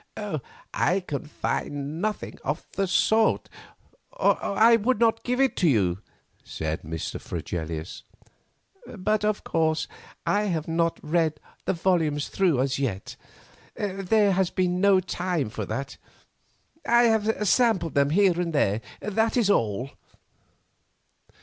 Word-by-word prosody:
"I 190 Hz, +2 st, +1 dB
can 150 Hz, -4 st, -5 dB
find 145 Hz, +1 st, -3 dB
nothing 215 Hz, 0 st, -3 dB
of -, -, -3 dB
the 195 Hz, -1 st, -1 dB
sort, 220 Hz, +4 st, +2 dB, 0.6 s
or -, -, +2 dB
I 225 Hz, +3 st, +5 dB
would 230 Hz, +1 st, +1 dB
not 225 Hz, -1 st, +2 dB
give 250 Hz, +1 st, -1 dB
it 270 Hz, -1 st, +3 dB
to 175 Hz, -, +3 dB
you," 95 Hz, -8 st, +2 dB, 0.4 s
said 80 Hz, 0 st, -4 dB
Mr. 80 Hz, 0 st, -5 dB
Fregelius. 80 Hz, -1 st, -5 dB, 1.0 s
"But, 210 Hz, +3 st, 0 dB
of 210 Hz, -1 st, 0 dB
course, 160 Hz, -1 st, 0 dB, 0.4 s
I 205 Hz, +1 st, +1 dB
have 165 Hz, -6 st, -2 dB
not 165 Hz, 0 st, 0 dB
read 160 Hz, -1 st, 0 dB, 0.3 s
the -, -, +1 dB
volumes 165 Hz, -5 st, 0 dB
through 175 Hz, -10 st, +2 dB
as 135 Hz, 0 st, -1 dB
yet. 110 Hz, -8 st, -3 dB, 0.6 s
There 200 Hz, +1 st, +1 dB
has 190 Hz, -1 st, +1 dB
been 180 Hz, -1 st, 0 dB
no 200 Hz, -2 st, +5 dB
time 175 Hz, -, -2 dB
for 110 Hz, -, -4 dB
that. 135 Hz, +5 st, -4 dB, 0.9 s
I 235 Hz, +1 st, +4 dB
have 220 Hz, -2 st, +2 dB
sampled 220 Hz, -8 st, +2 dB
them 140 Hz, 0 st, +3 dB
here 180 Hz, +1 st, +3 dB
and 170 Hz, -2 st, -2 dB
there, 110 Hz, -7 st, +1 dB, 0.2 s
that 220 Hz, +4 st, 0 dB
is 215 Hz, -4 st, +3 dB
all." 115 Hz, -, 0 dB
180 Hz, 130 wpm, -26 LUFS, 140-210 Hz, 1.0 s, I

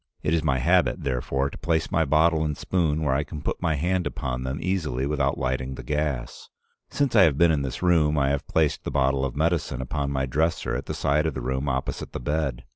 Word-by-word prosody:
It 80 Hz, -, +1 dB
is 85 Hz, -, +2 dB
my 65 Hz, -, +1 dB
habit, -, -, +2 dB
therefore, 65 Hz, +1 st, -1 dB
to -, -, -10 dB
place 80 Hz, -1 st, 0 dB
my 80 Hz, -1 st, +2 dB
bottle 80 Hz, +2 st, +3 dB
and 75 Hz, -2 st, -2 dB
spoon 80 Hz, -4 st, 0 dB
where 70 Hz, -3 st, +1 dB
I 70 Hz, +2 st, +1 dB
can 75 Hz, +1 st, -8 dB
put -, -, -3 dB
my 80 Hz, -, +1 dB
hand 90 Hz, +3 st, 0 dB
upon 65 Hz, -2 st, -4 dB
them 65 Hz, +2 st, -3 dB
easily 80 Hz, -9 st, -1 dB
without 70 Hz, -1 st, 0 dB
lighting 65 Hz, 0 st, -2 dB
the -, -, -8 dB
gas. 75 Hz, -5 st, -3 dB, 0.4 s
Since 140 Hz, -4 st, 0 dB
I 105 Hz, -, +8 dB
have 80 Hz, -7 st, +4 dB
been 85 Hz, +1 st, +5 dB
in 75 Hz, -3 st, +1 dB
this 70 Hz, +5 st, -4 dB
room, 80 Hz, -4 st, +3 dB
I 70 Hz, -1 st, +2 dB
have 70 Hz, 0 st, -2 dB
placed 80 Hz, -2 st, +1 dB
the -, -, -3 dB
bottle 70 Hz, 0 st, +1 dB
of 65 Hz, -3 st, -2 dB
medicine 80 Hz, -4 st, 0 dB
upon 70 Hz, +2 st, -2 dB
my 65 Hz, -1 st, -1 dB
dresser 80 Hz, +6 st, 0 dB
at -, -, -4 dB
the -, -, -3 dB
side 75 Hz, +3 st, +1 dB
of 80 Hz, -, -3 dB
the -, -, -3 dB
room 65 Hz, +3 st, -2 dB
opposite 65 Hz, -1 st, -3 dB
the -, -, -4 dB
bed. 70 Hz, -2 st, -2 dB
70 Hz, 235 wpm, -25 LUFS, 65-80 Hz, 0.4 s, I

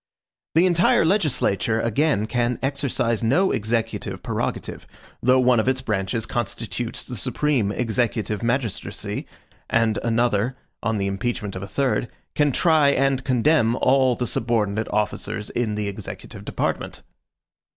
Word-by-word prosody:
The 165 Hz, +3 st, +6 dB
entire 175 Hz, -2 st, +4 dB
legislature, 135 Hz, -, +1 dB
again, 115 Hz, 0 st, +1 dB
can 120 Hz, +1 st, 0 dB
exercise 135 Hz, -5 st, 0 dB
no 165 Hz, +12 st, +3 dB
executive 115 Hz, +1 st, -2 dB
prerogative, -, -, -3 dB, 0.3 s
though 130 Hz, +1 st, +4 dB
one 125 Hz, -2 st, +4 dB
of 110 Hz, -, 0 dB
its 130 Hz, -1 st, +1 dB
branches 110 Hz, -1 st, -1 dB
constitutes 120 Hz, 0 st, -3 dB
the 125 Hz, -, -7 dB
supreme 120 Hz, +1 st, 0 dB
executive 115 Hz, -2 st, -1 dB
magistracy, 115 Hz, -2 st, -2 dB, 0.4 s
and 115 Hz, -1 st, +2 dB
another, 120 Hz, +1 st, +1 dB, 0.2 s
on 115 Hz, -1 st, 0 dB
the 100 Hz, -, -1 dB
impeachment 100 Hz, +1 st, -2 dB
of 95 Hz, -, -5 dB
a 100 Hz, -, -6 dB
third, 130 Hz, +1 st, 0 dB, 0.3 s
can 145 Hz, -1 st, +2 dB
try 155 Hz, 0 st, +4 dB
and 135 Hz, -1 st, +2 dB
condemn 125 Hz, -1 st, +3 dB
all 130 Hz, -1 st, +3 dB
the 125 Hz, -, -2 dB
subordinate 110 Hz, -2 st, 0 dB
officers 105 Hz, 0 st, -2 dB
in 115 Hz, -3 st, -1 dB
the 105 Hz, -1 st, -2 dB
executive 100 Hz, -, -8 dB
department. -, -, -3 dB
120 Hz, 130 wpm, -23 LUFS, 110-135 Hz, 0.4 s, The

